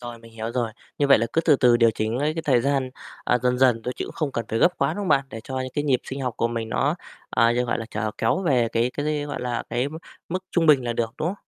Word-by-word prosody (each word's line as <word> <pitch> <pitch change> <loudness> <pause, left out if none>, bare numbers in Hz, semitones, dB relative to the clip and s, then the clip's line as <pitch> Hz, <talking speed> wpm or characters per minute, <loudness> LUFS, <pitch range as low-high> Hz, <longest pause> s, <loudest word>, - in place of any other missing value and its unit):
Rồi, 120 -1 -8
mình 115 0 -16
hiểu 115 +1 -5
rồi, 120 -3 -1 0.3
như 145 - +3
vậy 140 - +6
là 115 - 0
cứ 165 - +3
từ 150 -4 +4
từ 120 -2 +5
điều 115 -1 +5
chỉnh 110 +3 -2
ấy 150 +2 0
cái 165 - -3
thời 125 -5 +4
gian, 135 -1 0 0.3
à, 125 - +2
dần 125 0 +1
dần 125 -3 +4
thôi 125 - -2
chứ - - -3
cũng - - -9
không 150 -4 -2
cần 115 -3 -2
phải 115 - -1
gấp 180 - +3
quá, - - +1
đúng 205 - -4
không 200 - -3
bạn? 135 0 +3
Để 115 - -7
cho 130 -1 -4
những 130 0 -4
cái 145 - -1
nhịp 130 -4 +2
sinh 135 +1 -6
học 125 -3 -2
của 115 - +1
mình 115 -1 -3
nó, 145 +7 +1 0.4
à, 115 0 +3
d - - -3
gọi - - -1
là, 110 - -5
trở 110 0 -2
kéo 115 +12 +1
về 125 -8 +2
cái 115 +2 +1
cái, 150 0 -1
gọi 145 -3 -5
là, 125 -1 -2
cái 125 +4 -1
m 155 - -8 0.3
mức 185 +2 -3
trung 165 -2 +2
bình 140 -5 +5
là 120 - -1
được, 115 0 -2
đúng 165 - 0
không? 195 - -2
125 Hz, 315 wpm, -24 LUFS, 115-145 Hz, 0.4 s, vậy